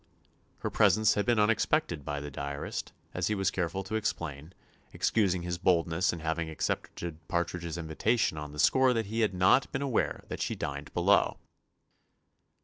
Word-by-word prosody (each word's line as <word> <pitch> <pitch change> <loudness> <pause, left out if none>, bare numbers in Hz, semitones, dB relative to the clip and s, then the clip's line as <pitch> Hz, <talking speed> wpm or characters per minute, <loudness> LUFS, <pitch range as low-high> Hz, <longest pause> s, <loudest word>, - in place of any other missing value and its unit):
Her - - -2
presence 110 0 +4
had 105 - -1
been 120 -2 +3
unexpected 105 - +2
by 70 0 -3
the 75 0 -6
diarist, 70 +1 -5 0.2
as 90 0 -1
he 105 - 0
was 95 -1 +1
careful 95 +2 -2
to 95 - -8
explain, 85 -8 -3 0.4
excusing 95 -5 +1
his 85 0 -3
boldness 85 -1 +2
in 85 - -6
having 80 0 -2
accepted 80 +1 -3
Partridge's 85 -1 -2
invitation 80 +5 0
on 75 -1 -6
the 75 - -10
score 130 +10 +4
that 115 -2 0
he 110 +3 -3
had 105 -4 +1
not 95 +8 +4
been 135 - -2
aware 130 -5 0
that - - -5
she - - -1
dined - - -5
below. - - +3
90 Hz, 165 wpm, -30 LUFS, 80-110 Hz, 0.4 s, presence